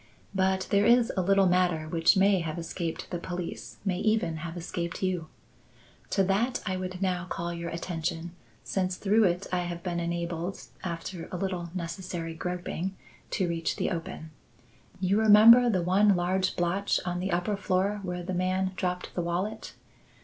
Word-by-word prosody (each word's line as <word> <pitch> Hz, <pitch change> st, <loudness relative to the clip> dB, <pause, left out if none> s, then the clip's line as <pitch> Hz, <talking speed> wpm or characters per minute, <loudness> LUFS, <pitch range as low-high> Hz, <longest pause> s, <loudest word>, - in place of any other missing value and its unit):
But 190 Hz, -1 st, +1 dB
there 200 Hz, +1 st, +4 dB
is 235 Hz, -1 st, +5 dB
a 185 Hz, -, +2 dB
little 195 Hz, +1 st, +4 dB
matter 180 Hz, -3 st, +2 dB
which 165 Hz, +4 st, +3 dB
may 195 Hz, 0 st, +4 dB
have 160 Hz, -1 st, -4 dB
escaped 165 Hz, 0 st, -4 dB
the 175 Hz, -, -2 dB
police, 175 Hz, 0 st, -6 dB
may 185 Hz, -2 st, 0 dB
even 215 Hz, -7 st, +1 dB
have 165 Hz, +2 st, -6 dB
escaped 170 Hz, +1 st, -4 dB
you. 180 Hz, -4 st, -1 dB, 0.8 s
To 195 Hz, -, +2 dB
that 215 Hz, +7 st, +1 dB
I 185 Hz, -, -1 dB
would 185 Hz, 0 st, -4 dB
now 180 Hz, -2 st, 0 dB
call 170 Hz, -1 st, -3 dB
your 170 Hz, 0 st, -4 dB
attention 170 Hz, 0 st, -3 dB, 0.3 s
since 185 Hz, -1 st, -1 dB
through 210 Hz, +2 st, +3 dB
it 180 Hz, +1 st, +1 dB
I 180 Hz, -, +2 dB
have 175 Hz, -1 st, -4 dB
been 175 Hz, -2 st, -2 dB
enabled, 170 Hz, +1 st, -3 dB, 0.2 s
after 170 Hz, 0 st, -5 dB
a 180 Hz, -, -3 dB
little 180 Hz, -2 st, -3 dB
necessary 170 Hz, -1 st, -4 dB
groping, 180 Hz, +2 st, -4 dB, 0.3 s
to 185 Hz, -, 0 dB
reach 165 Hz, -1 st, -1 dB
the -, -, -1 dB
open. 165 Hz, -2 st, -5 dB, 0.7 s
You 195 Hz, +2 st, +2 dB
remember 220 Hz, +3 st, +8 dB
the 185 Hz, -6 st, +1 dB
one 195 Hz, +3 st, +4 dB
large 185 Hz, +1 st, 0 dB
blotch 180 Hz, +3 st, +1 dB
on 180 Hz, -1 st, -2 dB
the 190 Hz, +2 st, -2 dB
upper 180 Hz, +4 st, 0 dB
floor 195 Hz, +1 st, 0 dB
where 180 Hz, -2 st, -4 dB
the 185 Hz, +2 st, -4 dB
man 185 Hz, +1 st, 0 dB
dropped 180 Hz, -1 st, -2 dB
the 175 Hz, -, -1 dB
wallet? 175 Hz, +5 st, -3 dB
180 Hz, 170 wpm, -28 LUFS, 170-195 Hz, 0.8 s, remember